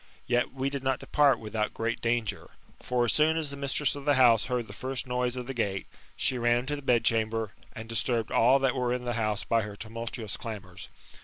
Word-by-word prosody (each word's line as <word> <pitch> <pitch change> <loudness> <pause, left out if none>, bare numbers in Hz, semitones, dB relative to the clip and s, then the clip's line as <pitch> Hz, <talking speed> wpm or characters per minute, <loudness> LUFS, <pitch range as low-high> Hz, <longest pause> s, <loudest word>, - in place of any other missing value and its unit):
Yet 120 0 +1
we 135 +1 -2
did 140 -1 -3
not 130 -1 +1
depart 145 -2 +3
without 110 0 -3
great 115 0 -2
danger. 115 -2 -1 0.3
For 125 -1 +1
as 115 - +2
soon 155 +1 +3
as 155 -3 -3
the - - -6
mistress 140 +1 0
of 140 -1 -8
the 145 -1 +4
house 120 -4 +5
heard 125 -2 -1
the 100 - -11
first 130 +4 -2
noise 125 0 -1
of 125 -1 -4
the 135 - -5
gate, 100 -5 -1 0.3
she 125 - 0
ran 120 0 +3
into 145 +4 -3
the 145 - -7
bedchamber, 115 -4 +1 0.2
and 110 0 -8
disturbed 115 0 -1
all 125 +4 +5
that 135 -2 +1
were 125 -1 0
in 125 0 -3
the 120 - -1
house 110 -3 -1
by 115 0 +2
her 105 -1 -6
tumultuous 115 0 -5
damours. 95 -5 -8
120 Hz, 220 wpm, -28 LUFS, 110-130 Hz, 0.3 s, house